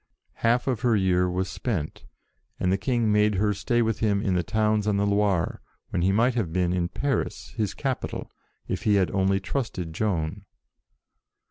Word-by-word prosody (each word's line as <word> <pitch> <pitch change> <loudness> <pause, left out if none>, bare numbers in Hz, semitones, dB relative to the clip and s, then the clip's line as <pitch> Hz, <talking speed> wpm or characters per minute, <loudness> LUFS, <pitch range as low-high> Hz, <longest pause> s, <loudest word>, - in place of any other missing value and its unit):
Half 120 +2 +3
of 125 -5 0
her 120 -3 +3
year 90 -2 +2
was 90 +1 -1
spent, 90 -11 -4 0.5
and 90 - +1
the 95 - +2
King 120 -1 +1
made 105 0 +3
her 105 +2 +2
stay 120 +4 +1
with 110 -1 -1
him 105 -3 +2
in 100 -2 0
the 90 - +2
towns 105 +3 +1
on 105 -1 +2
the 100 - +2
Loire, 100 -4 +1 0.3
when 85 - 0
he 95 +2 +3
might 120 +5 +3
have 110 -9 -1
been 90 0 +1
in 90 -1 0
Paris, 140 +6 -2
his 110 -5 -3
capital, 135 -3 -3 0.4
if - - -2
he 105 - +3
had 95 -2 +2
only 95 0 +2
trusted 95 - -3
Joan. 95 0 -2
100 Hz, 185 wpm, -26 LUFS, 90-110 Hz, 0.5 s, Half